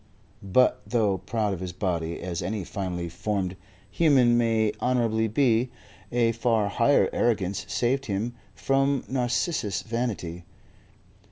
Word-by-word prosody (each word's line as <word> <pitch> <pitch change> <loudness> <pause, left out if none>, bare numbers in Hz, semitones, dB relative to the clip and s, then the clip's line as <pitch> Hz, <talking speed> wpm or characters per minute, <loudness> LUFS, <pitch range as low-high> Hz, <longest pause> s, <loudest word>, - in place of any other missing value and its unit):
But 125 +6 +3
though 105 -6 +1
proud 110 -3 -1
of 95 - -5
his 90 -1 -5
body 85 -3 -2
as 90 -1 -3
any 95 +3 -3
finely 90 -2 -4
formed 95 +1 -2 0.4
human 130 -5 +4
may 115 -2 +2
honorably 115 -3 +1
be, 120 +1 +2 0.4
a 120 -1 +3
far 115 -2 +1
higher 120 +7 +3
arrogance 100 -5 0
saved 120 +7 0
him 105 +4 -2 0.2
from 135 +6 +1
Narcissus 125 - -1
vanity. 110 -7 -3
110 Hz, 120 wpm, -26 LUFS, 95-120 Hz, 0.4 s, human